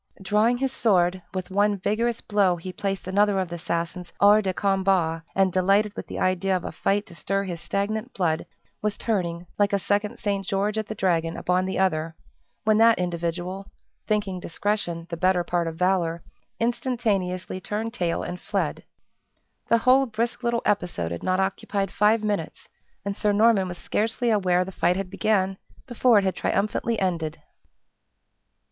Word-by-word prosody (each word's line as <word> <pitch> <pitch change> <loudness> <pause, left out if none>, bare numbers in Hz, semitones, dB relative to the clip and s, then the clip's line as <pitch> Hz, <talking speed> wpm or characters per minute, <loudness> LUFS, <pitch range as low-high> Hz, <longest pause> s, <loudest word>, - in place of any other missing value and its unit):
Drawing 210 +5 +2
his 265 +1 -1
sword, 185 -7 +2
with 185 0 -5
one 205 +1 +2
vigorous 230 +5 -1
blow 200 -4 +2
he 180 +2 -7
placed 195 0 -3
another 200 +1 +3
of 185 -2 -2
the 175 - -5
assassins 170 +1 -3
hors 205 +1 +6
de 190 -2 -1
combat; 190 -4 +1
and, 190 -2 +3
delighted 200 +3 +2
with - - -6
the - - -6
idea 185 +1 +1
of 180 - -8
a - - -4
fight 205 +1 0
to 195 - -14
stir 195 +3 -1
his 175 -3 -5
stagnant 210 +7 -2
blood, 165 -3 0 0.3
was 210 -1 -1
turning 175 -6 -2
(like 205 0 +3
a - - +4
second 205 +3 -1
St. 200 -1 -1
George 200 +3 0
at 215 - -4
the 215 - -5
Dragon), 170 -4 0
upon 180 +1 +1
the 190 - -2
other, 165 -4 0 0.5
when 215 0 +3
that 230 0 +6
individual, 175 +2 -3 0.4
thinking 205 -4 0
discretion 175 -1 -2
the 170 - -3
better 185 0 +2
part 170 -1 -1
of 165 - -4
valor, 175 -2 +1 0.4
instantaneously 210 -7 -1
turned 220 +4 -3
tail 175 -7 -1
and 180 0 -6
fled. - - -2 0.9
The 230 - +5
whole 255 +3 +4
brisk 230 +2 -2
little 235 -1 0
episode 175 - 0
had 85 - -4
not 185 0 +1
occupied 195 0 -1
five 215 +1 +3
minutes, 205 -7 -3 0.4
and 200 0 -2
Sir 210 0 +1
Norman 210 -2 +4
was 175 -1 -6
scarcely 225 +5 0
aware 185 -4 +2
the 190 - -7
fight 180 -1 +1
had 190 -1 -4
began 195 -2 +1 0.3
before 240 -2 +3
it 200 - +4
had 190 -1 0
triumphantly 215 +3 0
ended. 165 -4 -1
195 Hz, 170 wpm, -25 LUFS, 180-210 Hz, 0.9 s, hors